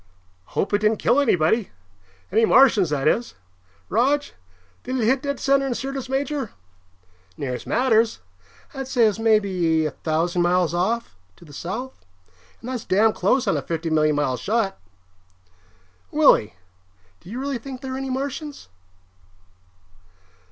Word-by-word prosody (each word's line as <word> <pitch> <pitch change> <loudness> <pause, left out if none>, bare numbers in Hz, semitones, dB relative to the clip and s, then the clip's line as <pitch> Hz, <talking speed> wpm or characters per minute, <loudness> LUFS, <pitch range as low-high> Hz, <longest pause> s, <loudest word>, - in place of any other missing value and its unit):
"Hope 200 - 0
it 205 - +3
didn't 215 +1 +2
kill 255 - +2
anybody. 200 - +2 0.6
Any 225 +3 +3
Martians, 225 - +5
that 145 -1 0
is. 235 +8 0 0.5
Rog, 275 +7 +2 0.6
did 260 - -4
it 225 - +1
hit 260 +3 +2
dead 280 -2 -3
center 275 0 +2
in 250 - -2
Syrtis 265 0 -5
Major?" 270 -2 -2 0.8
"Near 130 -3 -3
as 125 - -7
matters. 230 -2 +2 0.5
I'd 270 -1 -5
say 250 -3 +2
it 220 - +6
was 210 - -5
maybe 190 -8 +2
a 155 - -1
thousand 165 +4 -1
miles 175 -1 +2
off, 185 - -1 0.2
to 170 - -17
the 145 - -14
south. 225 - -6 0.6
And 245 - -7
that's 250 -4 -4
damn 215 +3 +3
close 240 +8 +1
on - - +2
a - - -2
fifty 165 +2 -4
million 155 -1 +3
mile 135 -4 0
shot. 215 - -1 1.3
Willie, 290 - +4 0.6
do - - -15
you 235 +5 -5
really 275 -2 -3
think 260 +1 -8
there 265 -1 -5
are - - -3
any 270 0 -4
Martians?" 280 +3 -5
225 Hz, 150 wpm, -23 LUFS, 175-265 Hz, 1.3 s, it